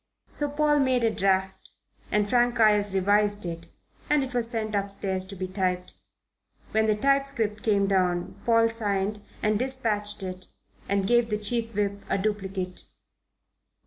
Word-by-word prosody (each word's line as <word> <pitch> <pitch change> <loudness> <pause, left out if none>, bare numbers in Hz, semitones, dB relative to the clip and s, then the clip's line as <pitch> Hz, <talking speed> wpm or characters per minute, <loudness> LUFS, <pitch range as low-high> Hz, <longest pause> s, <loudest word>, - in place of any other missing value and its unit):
So 290 -1 -2
Paul 295 0 +2
made 260 -3 +2
a 225 - +3
draft 190 0 0 0.4
and 210 -1 +2
Frank 240 +1 +2
Ayres 210 -2 +4
revised 205 +1 +2
it, 170 -1 -6 0.4
and 295 -2 +3
it 260 -1 -6
was 235 -2 +1
sent 220 -2 -3
upstairs 195 -2 -1
to 195 - -8
be 185 0 -4
typed. 185 -1 -2 0.8
When 220 0 +2
the 215 - +3
typescript 275 -4 0
came 200 -3 +2
down, 180 -3 0
Paul 230 -1 +4
signed 210 -2 -1 0.2
and 210 0 +2
dispatched 220 -6 -1
it 185 0 -7 0.4
and 200 -1 +1
gave 240 +2 +3
the 210 - 0
Chief 225 +1 0
Whip 200 -1 -1
a - - +1
duplicate. 190 -3 -3
210 Hz, 150 wpm, -26 LUFS, 195-230 Hz, 0.8 s, Ayres